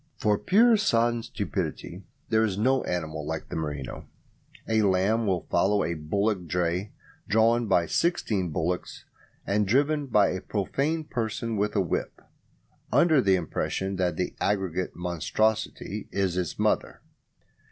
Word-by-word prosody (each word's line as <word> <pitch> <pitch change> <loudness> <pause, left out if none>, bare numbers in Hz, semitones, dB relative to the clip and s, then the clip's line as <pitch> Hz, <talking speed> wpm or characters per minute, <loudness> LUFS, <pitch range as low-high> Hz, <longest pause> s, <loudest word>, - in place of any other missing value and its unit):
For 105 -1 +1
pure, 225 +4 +5
sodden 120 - +2
stupidity - - -4 0.3
there 110 0 +3
is 100 -4 -1
no 130 +5 +2
animal 80 -3 -3
like 80 +1 -5
the - - -5
merino. 75 -4 -5 0.6
A 110 -1 +2
lamb 105 +3 +2
will 95 -3 0
follow 100 +1 +3
a 85 - -1
bullock 90 +4 -1
dray, 90 +4 -1 0.4
drawn 115 +3 +3
by 85 -4 +3
sixteen 105 - 0
bullocks 85 +4 -3 0.4
and 105 0 +1
driven 145 +5 +2
by 105 -5 +4
a 95 - -3
profane 140 - -1
person 115 -4 -3
with 105 +1 -1
a 100 - +3
whip, 90 - -3 0.7
under 160 -5 +5
the 95 -4 +4
impression 95 +2 -2
that 90 -3 0
the 90 - -2
aggregate 95 -3 -1
monstrosity 100 +5 -1
is 95 -3 0
his 90 -3 -2
mother. - - 0
100 Hz, 140 wpm, -27 LUFS, 90-115 Hz, 0.7 s, pure